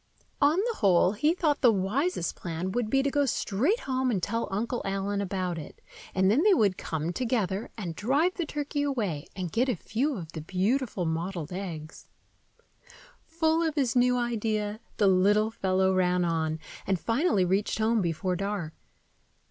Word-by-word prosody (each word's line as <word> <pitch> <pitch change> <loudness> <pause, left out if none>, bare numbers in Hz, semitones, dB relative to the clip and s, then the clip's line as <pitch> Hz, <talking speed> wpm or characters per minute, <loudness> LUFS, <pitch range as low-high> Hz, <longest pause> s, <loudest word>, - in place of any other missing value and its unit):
On 295 +4 +4
the 455 +4 0
whole, 185 -3 +4
he 295 +11 +1
thought 305 -5 +1
the 245 -4 +6
wisest 210 - -1
plan 170 +2 -4
would 230 +1 -1
be 270 +3 +2
to 280 - 0
go 285 -1 +2
straight 270 - 0
home 260 -1 0
and 195 -7 -1
tell 230 +2 -1
Uncle 230 +5 -2
Allen 195 +1 -1
about 185 -3 -2
it; 150 - -10 0.4
and 190 +1 +4
then 250 +8 +3
they 410 +1 +5
would 200 - +3
come 160 0 -3
together 215 -4 -1
and 175 -6 -5
drive 285 - +1
the 345 -5 -3
turkey 290 0 -3
away, 215 - -2
and 180 -3 -4
get 250 +7 +1
a 245 - +1
few 250 - -2
of 165 -3 -8
the 160 - -6
beautiful 195 - -1
mottled 165 0 -3
egg. 170 -5 -6 1.3
Full 325 0 0
of 320 -2 0
his 260 -6 +1
new 250 0 +4
idea, 220 -3 -1 0.2
the 210 - +3
little 205 +4 +3
fellow 190 -2 +1
ran 180 -1 +2
on, 160 -2 0 0.3
and 190 -2 +1
finally 230 - +2
reached 195 +3 0
home 220 0 +2
before 180 +1 -1
dark. 195 -4 -3
205 Hz, 170 wpm, -28 LUFS, 185-260 Hz, 1.3 s, the